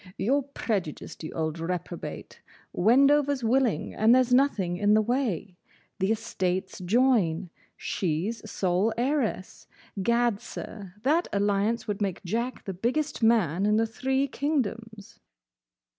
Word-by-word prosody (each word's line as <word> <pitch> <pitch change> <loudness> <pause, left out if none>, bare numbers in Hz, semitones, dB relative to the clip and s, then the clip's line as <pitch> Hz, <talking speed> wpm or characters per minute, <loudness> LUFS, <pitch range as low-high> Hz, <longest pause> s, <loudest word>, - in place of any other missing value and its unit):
"You 260 +8 +2
're - - +1
prejudiced, 210 - -4
you 155 - -5
old 160 0 -2
reprobate. 175 0 -5 0.3
Wendover 280 +7 +4
's 260 - -9
willing, 245 0 +1
and 225 +3 +5
there's 255 -1 +3
nothing 210 -10 +2
in 205 +2 +3
the - - +5
way. 215 - -2 0.4
The 190 +2 +1
estates 190 -5 -2
join. 190 -4 +2 0.3
She's 200 +6 -2
sole 190 +4 0
heiress. 245 -7 -2 0.3
Gad, 235 0 +1
sir, 195 -4 -8
that 315 +6 +2
alliance 205 +3 0
would 210 0 -3
make 195 -3 -2
Jack 235 +7 -3
the 195 - -4
biggest 250 - -1
man 205 -5 +3
in 210 - +3
the 225 - +3
Three 265 +4 -1
Kingdoms." 230 -7 -3
220 Hz, 130 wpm, -27 LUFS, 190-250 Hz, 0.4 s, and